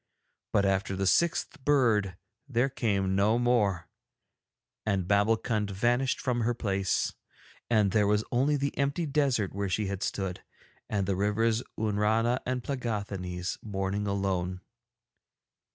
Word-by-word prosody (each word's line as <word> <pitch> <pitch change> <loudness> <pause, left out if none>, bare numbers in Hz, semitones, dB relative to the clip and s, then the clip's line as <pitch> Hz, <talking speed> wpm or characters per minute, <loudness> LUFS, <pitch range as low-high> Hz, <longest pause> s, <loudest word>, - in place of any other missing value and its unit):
But 100 - +3
after 95 0 0
the 95 +1 -1
sixth 165 - +1
bird 115 -10 +2 0.3
there 125 +1 +2
came 100 -7 0
no 105 +4 +3
more, 105 - +1 1.0
and 95 -4 0
Babbulkund 105 +1 +2
vanished 120 +7 +1
from 125 -2 0
her 120 +1 +1
place, 100 -4 0 0.6
and 105 -4 +3
there 105 0 +3
was 105 +1 +2
only 135 +4 +2
the 140 0 -1
empty 140 +5 0
desert 135 -9 +1
where 100 0 -2
she 105 +3 0
had 100 0 -4
stood, 95 -2 -3 0.5
and 100 -2 0
the 95 0 0
rivers 110 +4 +1 0.2
Oonrana 110 +3 +1
and 125 -1 -1
Plegáthanees 100 -8 -3
mourning 100 0 -2
alone. 95 -2 -1
105 Hz, 130 wpm, -29 LUFS, 95-120 Hz, 1.0 s, But